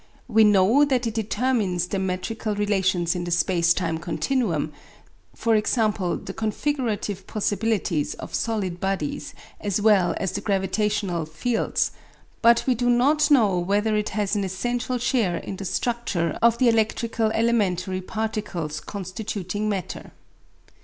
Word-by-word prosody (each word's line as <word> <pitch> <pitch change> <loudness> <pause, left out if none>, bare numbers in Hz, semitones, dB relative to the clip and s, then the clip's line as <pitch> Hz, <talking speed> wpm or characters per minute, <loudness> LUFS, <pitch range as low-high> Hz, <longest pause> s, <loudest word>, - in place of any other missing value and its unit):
We 220 - +5
know 210 +6 +5
that 260 -4 +1
it 225 - -2
determines 215 -5 0
the 195 +2 -3
metrical 190 +4 -2
relations 190 -4 +1
in 175 - -3
the 175 - -4
space 170 0 +2
time 165 -2 0
continuum, 170 - -1 0.6
e.g. - - -16
the 215 -4 +1
configurative 220 -4 -2
possibilities 205 -6 -1
of - - -9
solid 200 -6 -2
bodies 190 -6 -3 0.2
as 205 -1 -1
well 205 -4 +4
as 190 - -2
the 205 - -4
gravitational 195 -3 0
fields; 220 +10 -1 0.5
but 235 0 +5
we 260 - +3
do 245 +1 0
not 290 +6 +3
know 215 -11 +4
whether 205 +4 +1
it 210 0 0
has 205 0 0
an 205 - 0
essential 240 +6 -2
share 235 -7 +1
in 190 - -6
the 195 - -6
structure 190 -6 -1
of 235 0 +4
the 255 - +3
electrical 225 0 +1
elementary 190 -5 +1
particles 195 -7 -3
constituting 205 +1 -4
matter. 190 -3 -4
205 Hz, 135 wpm, -24 LUFS, 185-225 Hz, 0.6 s, We